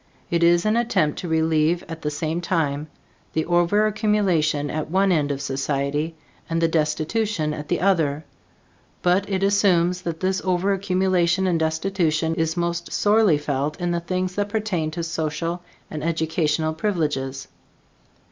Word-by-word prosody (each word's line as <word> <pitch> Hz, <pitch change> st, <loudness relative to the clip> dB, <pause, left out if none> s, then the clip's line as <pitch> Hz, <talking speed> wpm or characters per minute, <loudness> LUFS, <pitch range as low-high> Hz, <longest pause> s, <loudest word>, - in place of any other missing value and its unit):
It 170 Hz, 0 st, +1 dB
is 170 Hz, +1 st, +4 dB
an 215 Hz, +1 st, +2 dB
attempt 195 Hz, -11 st, +1 dB
to 180 Hz, -, -5 dB
relieve, 160 Hz, +1 st, +2 dB
at 165 Hz, 0 st, -7 dB
the 150 Hz, -, -1 dB
same 155 Hz, +3 st, -2 dB
time, 155 Hz, -4 st, -1 dB, 0.5 s
the 160 Hz, 0 st, 0 dB
overaccumulation 180 Hz, -5 st, +2 dB
at 155 Hz, 0 st, -3 dB
one 190 Hz, +3 st, +2 dB
end 150 Hz, -4 st, +2 dB
of 140 Hz, 0 st, -3 dB
society 140 Hz, +3 st, -2 dB, 0.3 s
and 165 Hz, 0 st, 0 dB
the 165 Hz, -, +3 dB
destitution 160 Hz, +2 st, 0 dB
at 150 Hz, 0 st, -6 dB
the 175 Hz, -, 0 dB
other; 160 Hz, -6 st, +1 dB, 0.8 s
but 185 Hz, +3 st, +2 dB
it 195 Hz, -1 st, -1 dB
assumes 185 Hz, -3 st, +3 dB
that 170 Hz, -2 st, -4 dB
this 190 Hz, 0 st, 0 dB
overaccumulation 185 Hz, -1 st, +1 dB
and 170 Hz, -2 st, +1 dB
destitution 160 Hz, 0 st, 0 dB
is 165 Hz, 0 st, -1 dB
most 170 Hz, 0 st, -2 dB
sorely 210 Hz, -6 st, +3 dB
felt 145 Hz, 0 st, -2 dB
in 175 Hz, -1 st, -1 dB
the 170 Hz, -, 0 dB
things 185 Hz, +1 st, -2 dB
that 205 Hz, +1 st, -1 dB
pertain 205 Hz, -7 st, -1 dB
to 165 Hz, +2 st, -4 dB
social 165 Hz, +1 st, -3 dB, 0.3 s
and 150 Hz, -1 st, -5 dB
educational 160 Hz, -1 st, 0 dB
privileges. 150 Hz, -7 st, -2 dB
170 Hz, 145 wpm, -23 LUFS, 155-185 Hz, 0.8 s, is